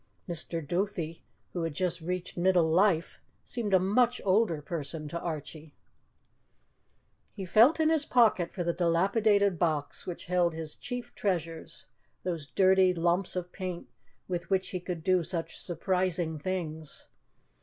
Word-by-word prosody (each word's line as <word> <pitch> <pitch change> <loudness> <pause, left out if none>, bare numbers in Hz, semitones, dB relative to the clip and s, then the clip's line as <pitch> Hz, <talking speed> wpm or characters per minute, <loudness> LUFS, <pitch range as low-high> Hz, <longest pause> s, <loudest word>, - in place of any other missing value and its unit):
Mr. 165 -2 -2
Duthie, 175 -2 -2 0.3
who 175 - -2
had 165 -3 -3
just 180 0 -1
reached 180 +2 -4
middle 175 -2 +3
life, 170 0 +2 0.3
seemed 230 -4 -2
a 190 - +7
much 240 +6 +2
older 195 -4 +3
person 155 0 -5
to 170 - -4
Archie. 155 -2 -6 1.6
He 195 -3 -5
felt 230 - +5
in 315 0 +4
his 315 -2 +3
pocket 225 -10 +3
for 180 - -3
the 170 0 0
dilapidated 200 +2 +2
box 155 -4 -1
which 180 - -6
held 175 -2 +1
his 160 -2 -6
chief 245 -1 -6
treasures 165 -5 -3 0.4
those 170 -5 -3
dirty 185 +4 +4
lumps 175 +3 +1
of 180 -1 -4
paint 185 -3 -6 0.4
with 175 -1 -4
which 190 -1 +1
he 185 - -3
could 175 -2 -5
do 185 0 +3
such 165 -1 -4
surprising 175 -2 -1
things. 160 -3 -5
180 Hz, 145 wpm, -29 LUFS, 165-190 Hz, 1.6 s, a